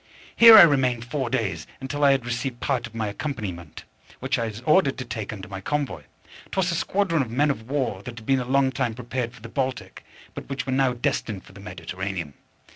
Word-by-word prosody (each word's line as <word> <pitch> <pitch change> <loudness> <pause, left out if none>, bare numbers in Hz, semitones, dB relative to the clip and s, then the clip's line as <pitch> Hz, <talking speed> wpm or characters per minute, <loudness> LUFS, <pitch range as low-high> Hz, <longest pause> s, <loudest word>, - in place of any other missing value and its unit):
Here 230 -1 +10
I 200 - +12
remained 130 -7 +2
four 130 0 -3
days, 115 -7 -2
until 145 +2 -3
I 140 - +7
had 135 -3 +1
received 120 +1 -3
part 125 -3 -1
of 115 - -17
my 110 -2 -2
accompaniment, 100 - -6 0.4
which - - -1
I 115 - -1
was 110 +1 -7
ordered 155 0 +3
to 130 - -5
take 110 -3 -5
under 95 -4 -8
my 95 0 -7
convoy. 145 - -2 0.5
'Twas 185 -2 0
a - - -1
squadron 185 -2 +1
of 125 - -3
men 145 +5 +2
of 110 -3 -7
war 130 -9 -1
that 120 +2 -9
had 110 - -10
been 135 +1 +2
a 125 - -3
long 135 +1 +2
time 115 -2 -2
prepared 120 0 -4
for 120 -3 -17
the - - -7
Baltic, 130 +2 -4 0.3
but - - -9
which 135 -1 -3
were 130 - -3
now 130 -1 +2
destined 110 -4 -2
for - - -17
the 100 - -13
Mediterranean. 90 -3 -5
125 Hz, 220 wpm, -24 LUFS, 110-135 Hz, 0.5 s, I